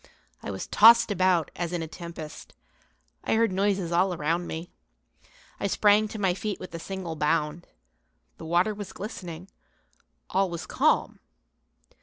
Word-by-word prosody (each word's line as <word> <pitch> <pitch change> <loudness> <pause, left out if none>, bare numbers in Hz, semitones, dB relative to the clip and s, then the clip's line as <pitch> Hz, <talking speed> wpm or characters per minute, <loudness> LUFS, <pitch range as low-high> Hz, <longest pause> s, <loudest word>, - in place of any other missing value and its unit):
I - - -6
was 95 -1 -4
tossed 230 +1 +7
about 185 -4 +2
as 175 -1 -3
in 175 -2 -2
a - - -5
tempest. 165 -2 -9 0.7
I - - +1
heard 225 -2 +3
noises 190 -2 0
around 170 -1 +1
me. 165 +2 -6 0.9
I 200 - 0
sprang 210 +2 +4
to 220 - -7
my 190 -3 +1
feet 205 +2 -4
with 185 - -9
a 165 - -5
single 185 -2 -5
bound. 150 +1 -1 0.7
The - - -9
water 175 +6 +2
was 200 -2 -8
glistening, 185 -4 -7 0.8
all 195 0 +2
was 170 -1 -5
calm. - - +1
180 Hz, 145 wpm, -27 LUFS, 165-200 Hz, 0.9 s, tossed